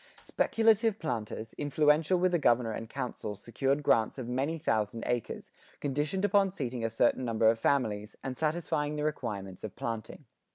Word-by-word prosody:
Speculative 225 Hz, -1 st, +2 dB
planters, 115 Hz, -, -4 dB
influential 150 Hz, +4 st, +3 dB
with 180 Hz, +1 st, +2 dB
the 175 Hz, -, +2 dB
Governor 120 Hz, -4 st, +3 dB
and 110 Hz, +1 st, -6 dB
Council 125 Hz, -5 st, -4 dB
secured 135 Hz, +7 st, -1 dB
grants 110 Hz, -3 st, +2 dB
of 130 Hz, -3 st, -5 dB
many 135 Hz, +6 st, -1 dB
thousand 115 Hz, -6 st, -1 dB
acres, 120 Hz, -2 st, -3 dB, 0.3 s
conditioned 150 Hz, +7 st, -1 dB
upon 200 Hz, -1 st, +4 dB
seating 130 Hz, -9 st, -4 dB
a 115 Hz, -, +1 dB
certain 120 Hz, +3 st, +2 dB
number 115 Hz, -2 st, +2 dB
of 115 Hz, -, -4 dB
families, 105 Hz, -6 st, 0 dB
and 130 Hz, -1 st, -4 dB
satisfying 150 Hz, -1 st, -1 dB
the 150 Hz, -, -2 dB
requirements 100 Hz, -11 st, -4 dB
of 110 Hz, -, -6 dB
planting. 115 Hz, +5 st, -5 dB
135 Hz, 160 wpm, -30 LUFS, 115-155 Hz, 0.3 s, upon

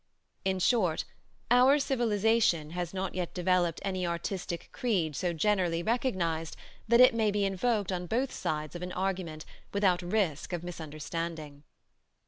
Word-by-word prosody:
In 190 Hz, 0 st, +1 dB
short, 185 Hz, -4 st, +2 dB, 0.5 s
our 255 Hz, +4 st, +6 dB
civilization 225 Hz, -, +2 dB
has 175 Hz, -1 st, -3 dB
not 190 Hz, 0 st, -3 dB
yet 180 Hz, -2 st, -4 dB
developed 180 Hz, -2 st, +1 dB
any 185 Hz, -2 st, -1 dB
artistic 170 Hz, 0 st, -3 dB
creed 180 Hz, -, 0 dB
so 175 Hz, +4 st, 0 dB
generally 175 Hz, -1 st, +1 dB
recognized 175 Hz, -9 st, -1 dB, 0.3 s
that 235 Hz, +1 st, +5 dB
it 255 Hz, 0 st, +8 dB
may 220 Hz, -2 st, +2 dB
be 205 Hz, -1 st, +1 dB
invoked 200 Hz, +1 st, 0 dB
on 180 Hz, -1 st, -3 dB
both 250 Hz, +7 st, 0 dB
sides 155 Hz, +1 st, -3 dB
of 175 Hz, -, -6 dB
an 180 Hz, 0 st, -5 dB
argument 180 Hz, -5 st, -3 dB, 0.3 s
without 190 Hz, -3 st, +2 dB
risk 175 Hz, -3 st, -1 dB
of 175 Hz, -1 st, -3 dB
misunderstanding. 160 Hz, -2 st, -5 dB
185 Hz, 140 wpm, -30 LUFS, 170-210 Hz, 0.5 s, it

